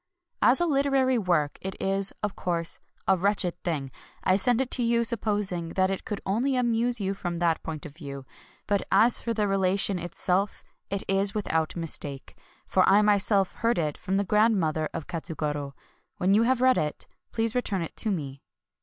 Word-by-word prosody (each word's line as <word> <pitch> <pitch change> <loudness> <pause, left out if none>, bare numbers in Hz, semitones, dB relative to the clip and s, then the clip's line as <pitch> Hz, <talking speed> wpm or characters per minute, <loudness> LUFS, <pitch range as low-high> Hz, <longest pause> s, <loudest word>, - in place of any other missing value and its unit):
As - - +5
a 345 - +2
literary 275 -4 +2
work 170 -7 0
it 190 0 -6
is, 195 0 +1
of 210 -1 -2
course, 170 -2 -2 0.3
a 190 - +5
wretched 190 -1 +1
thing. 145 -6 -2 0.3
I 185 - +3
send 240 +4 +2
it 265 -1 -1
to 250 - 0
you 235 0 +2
supposing 205 -7 0
that 190 0 +2
it 195 - -4
could 210 - -4
only 245 +8 0
amuse 240 -1 +1
you 195 -1 -1
from 175 -3 -4
that 170 -1 +1
point 155 -2 -6
of 150 - -9
view. 140 -4 -8 0.4
But 200 -1 +1
as 235 +2 +5
for 230 - -3
the 210 -1 +1
relation 195 0 +2
itself, 185 +3 -1 0.3
it 200 -1 -2
is 195 +1 +2
without 160 -6 -1
mistake; 150 -5 -3 0.3
for 185 - +2
I 205 +2 +5
myself 200 -2 +2
heard 230 +1 +1
it 150 -3 -1
from 190 +1 -2
the 200 - +2
grandmother 185 -8 +2
of 155 - -5
Katsugoro. 150 -4 -4 0.4
When 185 +2 +2
you 210 - +5
have 260 -1 +2
read 255 0 +4
it, 150 -1 -3 0.3
please 225 -1 0
return 205 -7 -1
it 165 - -8
to 220 - +1
me. 140 -8 -4
195 Hz, 185 wpm, -27 LUFS, 170-225 Hz, 0.4 s, As